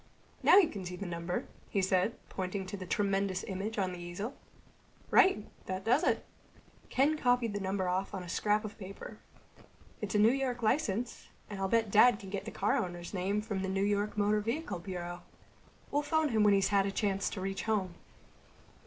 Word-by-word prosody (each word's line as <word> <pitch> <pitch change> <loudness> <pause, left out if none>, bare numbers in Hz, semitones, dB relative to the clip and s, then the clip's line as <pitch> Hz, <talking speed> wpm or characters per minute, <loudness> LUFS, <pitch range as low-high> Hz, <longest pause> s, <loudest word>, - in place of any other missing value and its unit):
"Now - - +7
you 390 -5 +7
can 200 -8 -6
see 180 0 -5
the 200 - -6
number," 170 0 -3 0.2
he 200 - 0
said, 190 +3 +2
pointing 190 +1 -3
to 185 - -5
the 185 -2 -7
tremendous 195 -1 0
image 200 +3 -4
on 190 -2 0
the 180 - -7
easel. 175 +8 -5 0.8
"Right. 375 - +5 0.2
That 185 0 -3
does 250 +9 +3
it." - - +1 0.6
Ken 295 +4 +2
copied 245 -4 +2
the 205 - -2
number 190 -1 -1
off 185 +2 -1
on 185 - -4
a - - -9
scrap 210 +4 +1
of 210 +2 -8
paper. 200 +2 -9 0.8
"It's 210 -1 -3
a - - +5
New 215 +2 +6
York 255 -2 -1
license. 230 -1 0 0.2
And 200 - -5
I'll 195 - 0
bet 225 0 +1
Dad 230 +2 +7
can 195 -2 -10
get 200 - -3
the - - -4
car - - +1
owner's 175 0 -4
name 195 +2 0
from 205 -3 -3
the 190 - -2
New 195 +1 0
York 205 +1 0
Motor 210 +1 +2
Vehicle 230 - -3
Bureau. 175 -1 -6 0.7
We'll 290 - +2
phone 310 +1 +1
him 220 -3 +2
when 205 -1 +6
he's 195 - +2
had 200 -1 +3
a - - -1
chance 195 -1 0
to 190 - -6
reach 195 +1 -2
home." 200 -5 0
200 Hz, 200 wpm, -32 LUFS, 190-220 Hz, 0.8 s, Now